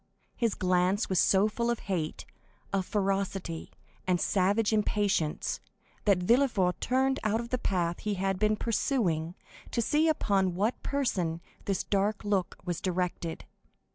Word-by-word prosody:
His 230 Hz, -4 st, 0 dB
glance 185 Hz, +3 st, +1 dB
was 190 Hz, -2 st, +2 dB
so 195 Hz, +2 st, +4 dB
full 235 Hz, +2 st, -1 dB
of 235 Hz, -, -1 dB
hate, 170 Hz, -5 st, -3 dB, 0.5 s
of 190 Hz, -2 st, 0 dB
ferocity, 195 Hz, -4 st, -1 dB, 0.4 s
and 180 Hz, -1 st, +2 dB
savage 205 Hz, +5 st, +2 dB
impatience, 205 Hz, -6 st, 0 dB, 0.5 s
that 200 Hz, -3 st, +5 dB
Villefort 195 Hz, -2 st, +2 dB
turned 265 Hz, +2 st, +1 dB
out 215 Hz, +1 st, +1 dB
of 235 Hz, 0 st, -5 dB
the 255 Hz, -, -1 dB
path 175 Hz, -6 st, 0 dB
he 210 Hz, -1 st, -2 dB
had 195 Hz, 0 st, -1 dB
been 215 Hz, 0 st, +3 dB
pursuing, 190 Hz, -, 0 dB, 0.3 s
to -, -, -2 dB
see 300 Hz, +7 st, +3 dB
upon 195 Hz, -, +1 dB
what 210 Hz, +6 st, 0 dB
person 185 Hz, -13 st, -1 dB, 0.3 s
this 195 Hz, -2 st, 0 dB
dark 205 Hz, +2 st, 0 dB
look 200 Hz, -4 st, 0 dB
was 175 Hz, -2 st, -3 dB
directed. 180 Hz, -2 st, -2 dB
195 Hz, 140 wpm, -29 LUFS, 180-225 Hz, 0.5 s, that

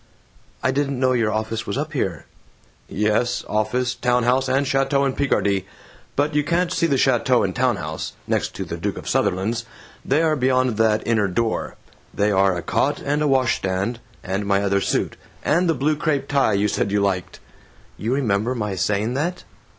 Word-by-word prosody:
"I 130 Hz, -, +3 dB
didn't 140 Hz, -1 st, -1 dB
know 130 Hz, 0 st, +3 dB
your 115 Hz, -3 st, +1 dB
office 110 Hz, +1 st, -3 dB
was 100 Hz, -, -2 dB
up 150 Hz, +2 st, -3 dB
here." 95 Hz, -, -2 dB, 0.6 s
"Yes, 110 Hz, +4 st, 0 dB
office, 120 Hz, +4 st, 0 dB
town 125 Hz, -1 st, +1 dB
house, 130 Hz, +2 st, +2 dB
and 135 Hz, +2 st, +2 dB
chateau 135 Hz, +1 st, +2 dB
in 135 Hz, -, 0 dB
Picardy. 100 Hz, -9 st, 0 dB, 0.5 s
But 145 Hz, +2 st, +1 dB
you 150 Hz, 0 st, +2 dB
can't 170 Hz, +3 st, 0 dB
see 170 Hz, -, +2 dB
the 140 Hz, -4 st, +1 dB
chateau 125 Hz, -1 st, +3 dB
and -, -, -2 dB
town 125 Hz, -2 st, +2 dB
house 80 Hz, -4 st, -5 dB
(next -, -, -1 dB
to -, -, -4 dB
the -, -, -5 dB
Duke -, -, -3 dB
of -, -, -8 dB
Sutherland's). 110 Hz, +6 st, 0 dB, 0.4 s
They're 155 Hz, +3 st, +2 dB
beyond 130 Hz, -3 st, +1 dB
that 110 Hz, -1 st, +2 dB
inner 110 Hz, -3 st, +2 dB
door. 110 Hz, +5 st, -1 dB, 0.4 s
They 105 Hz, +1 st, +2 dB
are 95 Hz, -2 st, +3 dB
a 85 Hz, -, -5 dB
cot -, -, 0 dB
and 145 Hz, +2 st, 0 dB
a 150 Hz, -, +2 dB
wash 130 Hz, -3 st, +2 dB
stand 95 Hz, +5 st, -2 dB, 0.2 s
and 100 Hz, +2 st, -2 dB
my 100 Hz, 0 st, +2 dB
other 100 Hz, 0 st, +1 dB
suit -, -, -1 dB, 0.3 s
and 170 Hz, +3 st, +2 dB
the 165 Hz, -, +2 dB
blue 145 Hz, +4 st, +1 dB
crepe 145 Hz, -3 st, -1 dB
tie 140 Hz, -6 st, +2 dB
you 100 Hz, +1 st, +2 dB
said 100 Hz, 0 st, -1 dB
you 105 Hz, -, +2 dB
liked." 95 Hz, -2 st, -1 dB, 0.6 s
"You 110 Hz, +5 st, -2 dB
remember 115 Hz, -2 st, 0 dB
my 105 Hz, -4 st, -2 dB
saying 105 Hz, +5 st, 0 dB
that?" 175 Hz, +6 st, -2 dB
120 Hz, 190 wpm, -22 LUFS, 100-140 Hz, 0.6 s, I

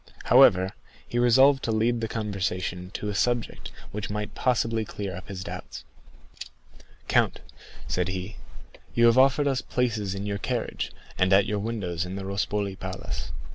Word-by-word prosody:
However, 95 Hz, +1 st, +6 dB, 0.4 s
he 120 Hz, -, -1 dB
resolved 130 Hz, +3 st, +5 dB
to 115 Hz, -, -1 dB
lead 115 Hz, +2 st, +1 dB
the 115 Hz, -, -1 dB
conversation 95 Hz, -4 st, -3 dB
to 105 Hz, -, -3 dB
a -, -, -2 dB
subject 120 Hz, +3 st, -1 dB, 0.2 s
which 105 Hz, -1 st, -4 dB
might 105 Hz, +1 st, -4 dB
possibly 115 Hz, -3 st, +1 dB
clear 100 Hz, -3 st, -5 dB
up 95 Hz, -, -9 dB
his 95 Hz, -2 st, -6 dB
doubts. -, -, -7 dB, 1.2 s
"Count," -, -, +2 dB, 0.5 s
said 90 Hz, -1 st, 0 dB
he, 95 Hz, +2 st, -5 dB, 0.6 s
"you 120 Hz, -, +5 dB
have 115 Hz, +2 st, +6 dB
offered 135 Hz, +2 st, +4 dB
us 135 Hz, -2 st, +1 dB
places 110 Hz, -6 st, -1 dB
in 100 Hz, +1 st, -4 dB
your 100 Hz, -1 st, -2 dB
carriage, -, -, -3 dB, 0.3 s
and 95 Hz, +1 st, +3 dB
at 100 Hz, +1 st, +6 dB
your 105 Hz, +1 st, -1 dB
windows 100 Hz, -6 st, -2 dB
in 90 Hz, +1 st, -5 dB
the 100 Hz, -1 st, -5 dB
Rospoli 100 Hz, 0 st, -1 dB
Palace. 95 Hz, 0 st, -5 dB
105 Hz, 160 wpm, -26 LUFS, 95-115 Hz, 1.2 s, However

